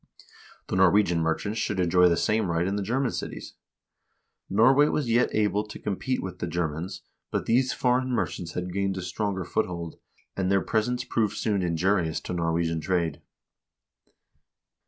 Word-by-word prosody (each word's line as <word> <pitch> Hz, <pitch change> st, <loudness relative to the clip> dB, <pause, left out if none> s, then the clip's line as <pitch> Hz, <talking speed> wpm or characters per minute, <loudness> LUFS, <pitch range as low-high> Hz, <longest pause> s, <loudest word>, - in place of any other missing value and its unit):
The -, -, -3 dB
Norwegian 95 Hz, -2 st, +4 dB
merchants 100 Hz, +7 st, -1 dB
should 105 Hz, -2 st, -1 dB
enjoy 90 Hz, 0 st, +4 dB
the 85 Hz, -, +2 dB
same 105 Hz, +3 st, +1 dB
right 85 Hz, +1 st, +1 dB
in 100 Hz, +2 st, -1 dB
the 105 Hz, -, -1 dB
German 125 Hz, +5 st, 0 dB
cities. -, -, -6 dB, 1.0 s
Norway 130 Hz, +8 st, +5 dB
was 150 Hz, -4 st, -1 dB
yet 120 Hz, +2 st, +3 dB
able 105 Hz, -1 st, +1 dB
to 105 Hz, -, -8 dB
compete 115 Hz, +6 st, -2 dB
with 90 Hz, -1 st, -6 dB
the 90 Hz, -, -2 dB
Ger 85 Hz, 0 st, 0 dB
mans, 85 Hz, +6 st, -6 dB, 0.3 s
but -, -, -2 dB
these 125 Hz, +3 st, +2 dB
foreign 125 Hz, +1 st, +1 dB
merchants 90 Hz, -8 st, -2 dB
had 90 Hz, 0 st, -4 dB
gained 100 Hz, 0 st, -1 dB
a 95 Hz, -, -4 dB
stronger 95 Hz, 0 st, -2 dB
foothold, 85 Hz, -2 st, -3 dB, 0.4 s
and 95 Hz, -1 st, 0 dB
their 100 Hz, -1 st, +3 dB
presence 120 Hz, +4 st, 0 dB
soon -, -, -22 dB
proved 110 Hz, -2 st, 0 dB
injurious 90 Hz, -4 st, +1 dB
to -, -, -5 dB
Norwegian 85 Hz, -1 st, 0 dB
trade. 85 Hz, -2 st, -1 dB
95 Hz, 160 wpm, -26 LUFS, 85-110 Hz, 1.0 s, Norway